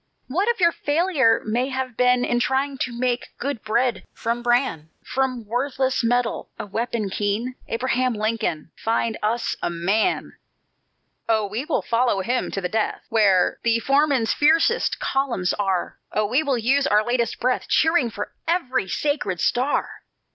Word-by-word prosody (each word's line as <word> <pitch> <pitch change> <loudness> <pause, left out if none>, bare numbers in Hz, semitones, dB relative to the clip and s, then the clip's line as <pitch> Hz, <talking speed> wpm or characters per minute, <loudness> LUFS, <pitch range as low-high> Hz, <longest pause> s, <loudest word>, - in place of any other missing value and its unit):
What 365 - -1
if 475 -2 +1
your 340 -2 +5
failure 295 -7 +2
may 240 +5 0
have 260 -2 -3
been 250 0 +3
In 240 - +1
trying 265 +2 0
to 240 -2 -3
make 250 -1 -2
good 275 -3 -3
bread 235 +3 0
from 235 +1 -2
bran, 240 - 0
From 255 -3 -2
worthless 260 +3 -1
metal 245 0 0
a - - -5
weapon 220 0 -2
keen? 210 +6 -1
Abraham 250 +1 0
Lincoln, 215 -8 -2
find 225 0 -1
us 225 +3 0
a - - 0
MAN! 180 +6 0 0.9
"Oh, 220 -2 +3
we 215 +7 -4
will 305 - 0
follow 235 -4 +1
him 245 +6 -1
to 195 - -3
the 180 - -1
death, 215 +3 -1
Where 195 -5 +3
the 230 -1 +2
foeman's 275 -1 +2
fiercest 325 +10 +3
columns 255 -10 0
are! 190 -3 -2
Oh, 215 - +1
we 250 +8 +2
will 280 -4 0
use 270 +5 +2
our 210 +1 +3
latest 240 -2 0
breath, 255 +1 0
Cheering 320 -6 +3
for 210 -1 -6
every 260 - 0
sacred 245 - -1
star! 255 - +1
240 Hz, 155 wpm, -23 LUFS, 215-265 Hz, 0.9 s, your